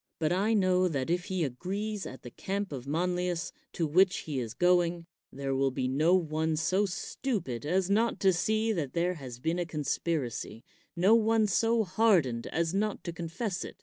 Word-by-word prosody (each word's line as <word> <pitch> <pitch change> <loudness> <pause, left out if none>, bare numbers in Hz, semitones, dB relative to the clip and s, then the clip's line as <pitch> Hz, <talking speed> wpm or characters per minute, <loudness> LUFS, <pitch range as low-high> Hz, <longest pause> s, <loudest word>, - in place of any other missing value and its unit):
But 155 -1 0
I 205 +5 +2
know 185 -2 +3
that 140 -3 -2
if 175 +1 0
he 185 -4 -1
arrives 195 - -4
at 130 - -10
the 120 - -9
camp 200 - -3
of 135 -2 -6
Manlius 180 +2 -1 0.2
to 165 - 0
which 180 +5 +3
he 145 -4 -3
is 115 -3 -5
going, 175 -1 +2 0.3
there 135 0 -3
will 135 0 +2
be 130 -1 -2
no 155 +7 +3
one 160 -2 0
so 185 +6 +1
stupid 175 - -3
as 185 +2 +1
not 220 +4 +1
to 190 -1 +5
see 220 +5 +1
that 150 -9 -3
thete 175 +1 0
has 130 -5 -8
been 165 +7 -1
a 175 - 0
conspiracy, 145 -6 -3 0.3
no 185 +5 +4
one 225 -1 +4
so 225 +3 +2
hardened 180 - +2
as 165 +1 -1
not 210 +1 -1
to 170 - -5
confess 175 +4 -4
it. - - -9
175 Hz, 185 wpm, -29 LUFS, 150-195 Hz, 0.3 s, to